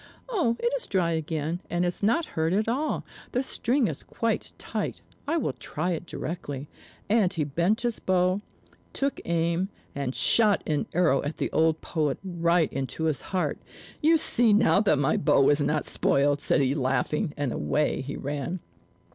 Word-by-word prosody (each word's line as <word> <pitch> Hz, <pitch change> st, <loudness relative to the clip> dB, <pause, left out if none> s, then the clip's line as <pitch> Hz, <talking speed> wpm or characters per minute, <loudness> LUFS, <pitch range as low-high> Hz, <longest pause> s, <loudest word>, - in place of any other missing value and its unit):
"Oh, 335 Hz, -, +1 dB
it 475 Hz, +1 st, 0 dB
is -, -, -3 dB
dry 180 Hz, -4 st, +1 dB
again, 160 Hz, +1 st, -2 dB
and 175 Hz, +1 st, 0 dB
is 175 Hz, -, -2 dB
not 235 Hz, +11 st, +2 dB
hurt 160 Hz, +2 st, +1 dB
at 210 Hz, +3 st, +1 dB
all; 275 Hz, +7 st, -1 dB, 0.3 s
the 250 Hz, -, +1 dB
string 260 Hz, 0 st, 0 dB
is -, -, -4 dB
quite 230 Hz, -1 st, -2 dB
tight. -, -, -4 dB, 0.2 s
I 325 Hz, +3 st, +1 dB
will 240 Hz, -, -1 dB
try 150 Hz, +8 st, -3 dB
it 170 Hz, 0 st, -4 dB
directly." 150 Hz, -5 st, -5 dB, 0.4 s
And 205 Hz, -4 st, +3 dB
he 165 Hz, -6 st, -1 dB
bent 170 Hz, +9 st, +1 dB
his 240 Hz, -2 st, -1 dB
bow, 185 Hz, +1 st, +1 dB, 0.5 s
took 275 Hz, 0 st, -1 dB
aim, 170 Hz, +2 st, 0 dB, 0.2 s
and 140 Hz, -2 st, -3 dB
shot 215 Hz, -4 st, +4 dB
an 150 Hz, -2 st, -1 dB
arrow 165 Hz, -6 st, +3 dB
at 145 Hz, +2 st, -4 dB
the -, -, -2 dB
old 160 Hz, 0 st, +2 dB
poet, 150 Hz, -5 st, -1 dB
right 170 Hz, -3 st, +1 dB
into 135 Hz, +4 st, -3 dB
his 155 Hz, -3 st, 0 dB
heart. 185 Hz, -2 st, -1 dB, 0.4 s
"You 325 Hz, +2 st, +5 dB
see 240 Hz, -7 st, +3 dB
now 205 Hz, -1 st, +4 dB
that 195 Hz, -8 st, +3 dB
my 145 Hz, +2 st, +2 dB
bow -, -, +3 dB
was 145 Hz, +2 st, +4 dB
not 150 Hz, +1 st, 0 dB
spoiled," 145 Hz, +1 st, +2 dB
said -, -, +2 dB
he 135 Hz, 0 st, +2 dB
laughing; 145 Hz, +5 st, 0 dB
and 145 Hz, -4 st, -1 dB
away 150 Hz, +2 st, 0 dB
he 140 Hz, +2 st, -5 dB
ran. 145 Hz, +6 st, -3 dB
170 Hz, 175 wpm, -27 LUFS, 145-210 Hz, 0.5 s, You